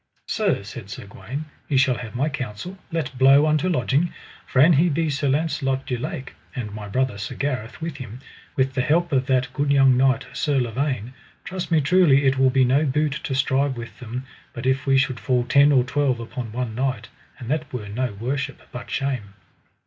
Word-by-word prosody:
Sir, 200 Hz, -, 0 dB
said 100 Hz, 0 st, -9 dB
Sir 100 Hz, -, -7 dB
Gawaine, 135 Hz, +9 st, -7 dB, 0.2 s
ye 140 Hz, -, +2 dB
shall 130 Hz, -2 st, +3 dB
have 115 Hz, -2 st, -8 dB
my 135 Hz, +5 st, +1 dB
counsel: 135 Hz, -, -5 dB, 0.2 s
let 155 Hz, -5 st, -2 dB
blow 135 Hz, +3 st, +7 dB
unto 155 Hz, +3 st, +2 dB
lodging, 150 Hz, +1 st, +1 dB, 0.4 s
for 130 Hz, -, 0 dB
an 160 Hz, +6 st, +7 dB
he 165 Hz, +5 st, +4 dB
be 160 Hz, 0 st, 0 dB
Sir 140 Hz, 0 st, 0 dB
Launcelot 135 Hz, -2 st, 0 dB
du 125 Hz, -, -2 dB
Lake, 130 Hz, +2 st, -5 dB, 0.2 s
and 110 Hz, -5 st, -4 dB
my 105 Hz, -1 st, -7 dB
brother, 125 Hz, 0 st, -1 dB
Sir 105 Hz, -, -5 dB
Gareth, 125 Hz, -5 st, -3 dB
with 160 Hz, -3 st, -5 dB
him, 125 Hz, -2 st, -8 dB, 0.4 s
with 130 Hz, 0 st, +1 dB
the 130 Hz, -, +1 dB
help 165 Hz, +5 st, +2 dB
of 130 Hz, -1 st, +1 dB
that 130 Hz, -2 st, +1 dB
good 145 Hz, 0 st, 0 dB
young 135 Hz, -2 st, +5 dB
knight, 130 Hz, -1 st, +3 dB
Sir 145 Hz, -3 st, +1 dB
Lavaine, 125 Hz, 0 st, -2 dB, 0.3 s
trust 185 Hz, -1 st, -5 dB
me 165 Hz, -2 st, +3 dB
truly 145 Hz, -3 st, +4 dB
it 135 Hz, 0 st, +3 dB
will 135 Hz, 0 st, +5 dB
be 130 Hz, 0 st, +3 dB
no 135 Hz, +4 st, +3 dB
boot 150 Hz, +1 st, +1 dB
to 135 Hz, -, -2 dB
strive 135 Hz, 0 st, +1 dB
with 120 Hz, 0 st, -8 dB
them 125 Hz, +1 st, -6 dB, 0.3 s
but 120 Hz, -, -6 dB
if 130 Hz, +2 st, +1 dB
we 135 Hz, 0 st, +5 dB
should 130 Hz, -2 st, +1 dB
fall 125 Hz, -2 st, +1 dB
ten 140 Hz, +4 st, +5 dB
or 130 Hz, -3 st, +5 dB
twelve 130 Hz, -1 st, 0 dB
upon 115 Hz, 0 st, -6 dB
one 120 Hz, -1 st, -3 dB
knight, 125 Hz, -2 st, -2 dB, 0.3 s
and 120 Hz, -, -9 dB
that 155 Hz, -1 st, -2 dB
were 115 Hz, -5 st, -5 dB
no 120 Hz, +2 st, -2 dB
worship, 130 Hz, +7 st, -3 dB
but 125 Hz, -, -8 dB
shame. 125 Hz, -8 st, -3 dB
135 Hz, 205 wpm, -23 LUFS, 125-145 Hz, 0.4 s, blow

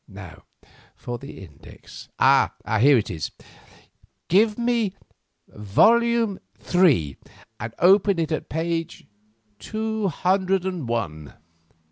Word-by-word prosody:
Now -, -, -12 dB, 0.5 s
for 120 Hz, -1 st, -7 dB
the 135 Hz, -7 st, -11 dB
index. 70 Hz, -5 st, -15 dB
Ah! -, -, +4 dB, 0.3 s
here 140 Hz, +3 st, +5 dB
it 110 Hz, -2 st, -2 dB
is. 80 Hz, -4 st, -4 dB, 1.0 s
Give 210 Hz, +4 st, +3 dB
me 235 Hz, -5 st, -1 dB, 0.5 s
volume 225 Hz, -, +2 dB, 0.2 s
three, 140 Hz, -, +1 dB, 0.4 s
and 115 Hz, 0 st, -7 dB
open 195 Hz, +1 st, +4 dB
it 165 Hz, -1 st, -2 dB
at 155 Hz, -, -3 dB
page 165 Hz, +1 st, -3 dB, 0.5 s
two 220 Hz, -, -3 dB
hundred 190 Hz, +1 st, 0 dB
and 180 Hz, -8 st, -4 dB
one." 80 Hz, -11 st, -4 dB
175 Hz, 105 wpm, -23 LUFS, -, 1.0 s, here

